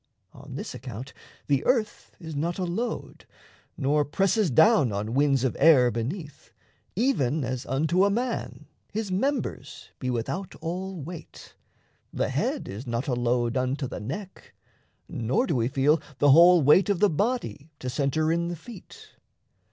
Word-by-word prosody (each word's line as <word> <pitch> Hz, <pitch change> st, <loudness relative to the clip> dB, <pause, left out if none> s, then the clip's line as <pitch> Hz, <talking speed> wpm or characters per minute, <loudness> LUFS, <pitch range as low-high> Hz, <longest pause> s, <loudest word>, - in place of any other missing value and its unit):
On -, -, -11 dB
this -, -, -5 dB
account, 125 Hz, +2 st, -8 dB, 0.3 s
the 140 Hz, -2 st, +1 dB
earth 230 Hz, -5 st, -1 dB
is 160 Hz, -3 st, -8 dB
not 165 Hz, +4 st, -2 dB
a 190 Hz, -, -2 dB
load, 185 Hz, +8 st, -4 dB, 0.5 s
Nor 145 Hz, +1 st, +2 dB
presses 195 Hz, +6 st, +1 dB
down 160 Hz, -, +5 dB
on 105 Hz, +3 st, -3 dB
winds 140 Hz, -1 st, +2 dB
of 130 Hz, -, 0 dB
air 135 Hz, -5 st, +6 dB
beneath; 145 Hz, -, -6 dB, 0.4 s
Even 160 Hz, -, +1 dB
as 125 Hz, +1 st, -4 dB
unto 160 Hz, +8 st, +2 dB
a 200 Hz, -, +4 dB
man 240 Hz, +4 st, -3 dB, 0.3 s
his 215 Hz, -2 st, -3 dB
members 200 Hz, -, -3 dB
be 130 Hz, -, -3 dB
Without 125 Hz, +11 st, -3 dB
all 185 Hz, +2 st, -5 dB
weight 160 Hz, +3 st, -10 dB, 0.6 s
the -, -, -1 dB
head -, -, -2 dB
is 110 Hz, +7 st, -7 dB
not 120 Hz, +2 st, -2 dB
a 130 Hz, -, 0 dB
load 120 Hz, 0 st, 0 dB
Unto 130 Hz, +2 st, -1 dB
the -, -, -6 dB
neck; 175 Hz, -, -8 dB, 0.5 s
nor 125 Hz, -, 0 dB
do 160 Hz, -, -1 dB
we 115 Hz, -2 st, +1 dB
feel 140 Hz, +3 st, +2 dB, 0.2 s
the 145 Hz, 0 st, +5 dB
whole 170 Hz, +2 st, +7 dB
Weight 165 Hz, +9 st, +5 dB
of 200 Hz, -, +2 dB
the 210 Hz, -, +5 dB
body 200 Hz, -, -2 dB
to 130 Hz, -, -7 dB
centre 145 Hz, +4 st, 0 dB
in 170 Hz, +1 st, 0 dB
the 175 Hz, -, -3 dB
feet. 195 Hz, +5 st, -13 dB
150 Hz, 160 wpm, -26 LUFS, 130-190 Hz, 0.6 s, whole